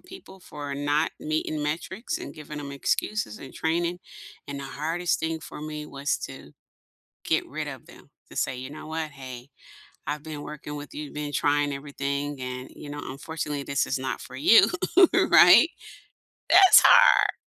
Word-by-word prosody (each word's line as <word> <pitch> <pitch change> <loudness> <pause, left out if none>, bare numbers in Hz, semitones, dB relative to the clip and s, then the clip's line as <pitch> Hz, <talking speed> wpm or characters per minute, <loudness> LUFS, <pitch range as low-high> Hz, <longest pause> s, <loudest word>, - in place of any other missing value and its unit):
people 365 - -14
for 145 -4 -7
not 145 +3 0
meeting 155 0 -2
metrics 190 - -3
and - - -8
giving 150 -1 -8
'em 140 -1 -7
excuses 140 - -2
and 135 - -11
training, 170 +2 -1 0.5
and 140 -1 -6
the 140 - -6
hardest 165 +6 -2
thing 160 0 -2
for - - -10
me 150 0 -6
was 140 0 -2
to 135 - -12 0.7
get - - 0
rid - - -5
of - - -10
them, - - -17 0.2
to - - -13
say, 130 - -1
"You 130 +1 -7
know 155 +1 -10
what, 160 -1 -4
hey, 130 -2 -10 0.6
I've 150 0 -3
been 155 -2 -7
working 150 0 -8
with 145 0 -9
you, 150 -1 -7
been 150 -1 -5
trying 145 0 +1
everything, 140 0 -4
and 125 0 -6
you - - -10
know, 145 - -6
unfortunately, 145 +1 -5
this 140 -1 -1
is 135 - -1
not 130 0 -4
for - - -11
you," 150 +11 +6 0.5
right? 320 - +7 0.8
That's 380 -1 +9
hard. - - +6
150 Hz, 170 wpm, -26 LUFS, 140-160 Hz, 0.8 s, That's